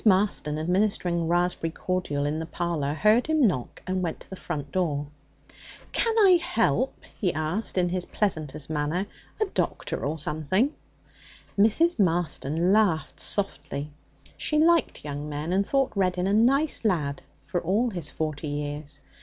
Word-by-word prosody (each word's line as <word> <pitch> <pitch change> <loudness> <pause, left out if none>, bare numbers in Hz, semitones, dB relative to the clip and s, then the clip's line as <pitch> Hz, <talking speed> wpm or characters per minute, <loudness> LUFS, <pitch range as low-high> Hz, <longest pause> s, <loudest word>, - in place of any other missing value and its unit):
Marston, 190 -7 +2
administering 175 0 +1
raspberry 175 -1 +1
cordial 160 -4 -2
in 150 +2 -1
the 160 - -3
parlour, 165 -4 -2
heard 215 - +4
him 315 -4 +3
knock, 130 - -1
and 185 0 -1
went 170 -3 -2
to - - -11
the - - -5
front 145 -6 -5
door. 150 -6 0 0.9
'Can 460 -1 +1
I 380 -5 +7
help?' 230 - 0 0.2
he 185 -4 +2
asked 160 +8 -2
in 180 -1 +3
his 180 0 -2
pleasantest 155 -8 -2
manner. 155 +5 -1 0.3
'A 430 - +3
doctor - - -2
or 150 +3 -1
anything?' 185 - +1 0.8
Mrs. 225 +11 +3
Marston 170 -1 +1
laughed 200 -7 +2
softly. 150 -7 -2 0.5
She 305 - +1
liked 330 - +3
young 145 +1 -4
men, 150 +4 -3
and 195 +1 +2
thought 275 -1 +2
Reddin 185 -2 +1
'a 195 - +1
nice 270 +8 +3
lad,' 155 -10 0 0.2
for 175 +5 -2
all 215 +8 +1
his 170 -6 -3
forty 155 -1 -3
years. 145 0 -3
175 Hz, 150 wpm, -26 LUFS, 150-210 Hz, 0.9 s, I